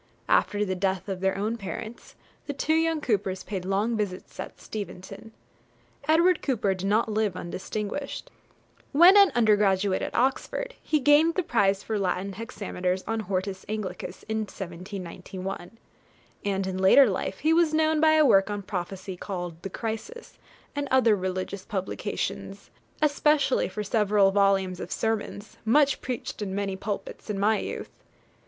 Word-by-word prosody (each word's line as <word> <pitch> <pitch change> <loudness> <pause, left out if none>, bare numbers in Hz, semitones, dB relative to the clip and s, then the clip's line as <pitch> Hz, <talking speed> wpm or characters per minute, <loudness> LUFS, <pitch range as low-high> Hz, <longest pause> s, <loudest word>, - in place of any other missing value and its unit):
After 205 -1 +2
the 190 - -1
death 190 0 -1
of 190 -2 -3
their 190 +1 0
own 215 +4 -1
parents, 220 +2 -7 0.3
the 285 - -2
two 290 +3 0
young 325 -1 +2
Coopers 200 -6 -1
paid 190 -3 -4
long 205 +5 0
visits 200 -4 -4
at - - -7
Steventon. 200 0 -8 0.8
Edward 335 +2 +4
Cooper 215 -8 +1
did 190 +1 -4
not 215 +4 +2
live 215 -3 0
undistinguished. 210 +9 -5 0.6
When 345 +7 +8
an 400 -2 +7
undergraduate 205 -4 +3
at - - -4
Oxford, 270 - 0
he 310 - +1
gained 295 +4 +5
the 370 - +1
prize 200 -8 +2
for 220 -2 -2
Latin 190 +1 -1
hexameters 185 -3 -3
on 225 +1 -1
'Hortus 190 -1 -3
Anglicus' 190 -4 -5
in 220 0 -1
1791; 185 0 -7 0.7
and 195 -2 -1
in 190 0 -3
later 220 +8 +7
life 190 -1 -2
he 315 +2 +2
was 330 -1 +4
known 315 0 +2
by 315 0 +6
a 310 -1 +5
work 195 -6 +5
on 205 -1 -3
prophecy, 190 0 -5
called 175 -3 -6
'The 195 - -5
Crisis,' 225 - -6 0.4
and 285 0 -2
other 245 -5 +5
religious 185 0 -3
publications, 190 -2 -4 0.3
especially 295 -4 +3
for 210 +3 -4
several 205 -2 +3
volumes 195 -2 +2
of 180 - -6
Sermons, 220 -1 -3
much 280 +5 +3
preached 250 -3 -5
in 190 -2 -3
many 200 -1 -2
pulpits 200 +2 -5
in 210 - -2
my 215 +2 +3
youth. - - -5
205 Hz, 150 wpm, -27 LUFS, 190-245 Hz, 0.8 s, When